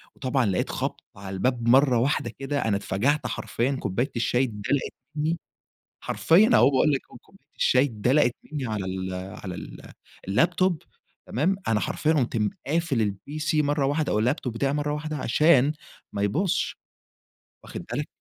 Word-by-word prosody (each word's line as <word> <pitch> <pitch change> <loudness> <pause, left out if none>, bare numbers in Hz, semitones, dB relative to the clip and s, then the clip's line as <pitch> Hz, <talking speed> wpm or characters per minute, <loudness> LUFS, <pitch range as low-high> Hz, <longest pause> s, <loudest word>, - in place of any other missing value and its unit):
وطبعًا 130 -1 0
لقيت 95 -3 0
خَبْط - - -3
على 95 0 -8
الباب 120 +4 0
مرّة 130 0 +5
واحدة 140 +5 0
كده 140 0 -2
أنا 100 -3 +2
اتفَجَعت 125 +8 0
حرفيًا 125 +3 -1
كوباية 120 +9 -1
الشاي 120 +2 +1
اتدلَقِت 115 +4 -2 0.2
منّي 160 +3 0 0.6
حرفيًا 200 +8 +4
أهو - - +6
وباقول 140 +2 +3
لك 135 - +1 0.2
كوباية 195 - -24
الشاي 130 +2 +4
اتدلَقِت 125 +1 +2 0.2
منّي 140 -4 -3
على 105 -4 -3
ال 95 0 -4
على 95 0 -6
ال - - -10 0.4
اللاب 135 - +3
توب 185 -4 +1 0.4
تمام؟ 165 - +1
أنا 105 -2 +2
حرفيًا 155 +1 0
قمت 125 -6 0 0.3
قافل 135 - 0
الPC 155 +3 -2
مرّة 145 -1 +1
واحدة 145 +2 0
أو 105 - +2
اللاب 125 +7 +2
توب 125 -7 -5
بتاعي 135 +4 0
مرّة 145 0 -1
واحدة 155 +1 -3
عشان 145 +1 +4 0.4
ما 100 - -2
يبوظش. 175 - 0 0.9
واخد - - -7
بالك؟ - - -2
135 Hz, 160 wpm, -25 LUFS, 110-150 Hz, 0.9 s, أهو